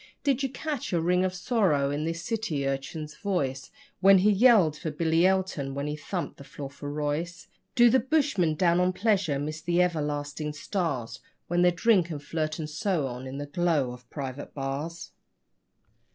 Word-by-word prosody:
Did 275 -2 +2
you 270 - 0
catch 290 +1 -4
a 170 - +3
ring 180 +2 +2
of 185 0 -1
sorrow 175 - +1
in 145 +2 -2
the 165 - -1
city 170 -4 -3
urchin's 150 +3 -4
voice 140 -10 -2 0.3
When 195 +1 +7
he 200 +3 +4
yelled 205 -7 +5
for 160 - -4
Billy 165 +3 +2
Elton, 185 -8 -1
when 140 0 -2
he 150 0 -2
thumped 160 +1 -5
the 140 - -11
floor 140 0 -8
for 145 +1 -7
Royce? 150 +4 -3 0.3
Do 240 -1 +7
the 260 +3 +5
bushmen, 250 - +1
down 170 +1 +3
on 180 0 +2
pleasure, 190 -8 +1
miss 155 +3 -4
the 170 +1 0
everlasting 150 -3 -1
stars 140 - -3 0.3
When 175 +1 +2
they 180 - +6
drink 175 0 +3
and 155 -3 -4
flirt 155 +1 -3
and 155 -2 -4
so 155 +1 -1
on 125 0 -6
in 130 +1 -6
the 145 - -4
glow 150 -4 0
of 125 -1 -12
private 140 -1 -6
bars? 145 +5 -4
165 Hz, 180 wpm, -27 LUFS, 145-185 Hz, 0.3 s, When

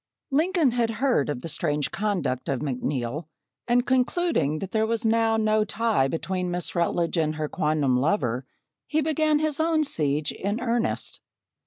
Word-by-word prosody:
Lincoln 320 -1 +3
had 235 -1 +1
heard 250 - +2
of 125 -4 -3
the - - -4
strange 150 -2 -1
conduct 195 -11 -1
of 135 -3 -1
McNeil 135 +1 -2 0.4
and 245 +1 +3
concluding 260 - +1
that 190 +4 -6
there 220 0 +1
was 230 0 -1
now 225 0 +3
no 215 0 +2
tie 220 -9 +1
between 180 +4 -2
Miss 175 0 -3
Rutledge 170 0 0
and 155 -1 +1
her 155 0 -2
quondam 145 -4 +1
lover, 130 - +1 0.5
he 310 0 +1
began 310 0 +2
his 310 -1 0
own 320 -1 +2
siege 150 - 0
in 205 +4 -3
earnest. 235 -1 -1
205 Hz, 160 wpm, -25 LUFS, 150-245 Hz, 0.5 s, Lincoln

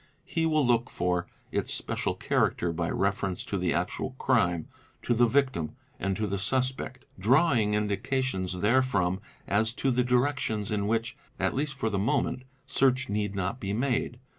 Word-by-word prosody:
He 165 -2 0
will 155 -3 +3
look 120 0 +2
for 90 0 -1 0.2
its - - -1
special - - -1
character 85 -1 +1
by 85 +1 -1
reference 100 -1 -1
to - - -3
the 90 -1 +1
actual 90 +8 -2
crime, 90 -13 +2 0.4
to 120 - +2
the 120 +1 +4
victim, 130 - +1 0.2
and 95 0 -1
to 110 - 0
the 100 -1 -2
suspect, 130 +3 0
draw 135 - +4
ing 105 -3 +2
indications 105 -2 -1
therefrom 100 -6 +2 0.2
as 110 +4 +1
to 135 +1 0
the 125 0 +2
directions 125 -4 0
in 100 -1 0
which, 115 +1 0 0.2
at - - +1
least 140 +1 -2
for 115 -5 -1
the 100 - 0
'moment, 130 +3 0 0.2
search 130 -1 +2
need 105 -1 -1
not 100 +5 -2
be 100 -3 -3
made. 125 +1 0
110 Hz, 165 wpm, -28 LUFS, 100-130 Hz, 0.4 s, the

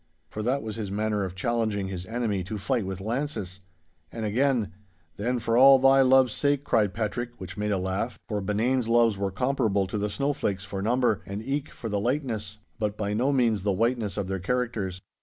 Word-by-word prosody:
For 110 - -4
that 130 +5 0
was 110 0 -5
his 105 -3 -4
manner 105 0 -1
of 95 -1 -5
challenging 110 -1 -1
his 90 -1 -6
enemy 110 -5 -1
to 105 +3 -4
fight 115 0 -1
with 95 0 -4
lances. 110 -5 -3 0.5
And 115 -1 -4
again, 120 +1 +1 0.5
'Then 125 +5 0
for 115 -1 0
all 135 +2 +8
thy 135 +1 +5
loves 130 -2 +5
sake,' 145 -1 +1
cried 105 -8 +1
Patrick, 120 +2 -3
which 95 - -7
made 105 0 -1
a 100 - +2
laugh, 95 +6 -2
for 105 -3 -2
Benane's 110 +5 0
loves 115 -2 +4
were 100 0 -1
comparable 110 -2 +1
to 100 +3 -3
the 105 +1 -1
snowflakes 105 -6 -1
for 100 -1 -5
number, 120 0 +1
and 100 +3 -5
eke 140 +3 -2
for 115 - -7
the 105 -2 -1
lightness—but 105 -4 -3
by 105 -1 -2
no 125 +6 +1
means 120 -7 +2
the 100 0 +1
whiteness 115 0 0
of 100 -2 -2
their 95 0 -2
characters. 100 -4 -2
110 Hz, 195 wpm, -27 LUFS, 100-125 Hz, 0.5 s, all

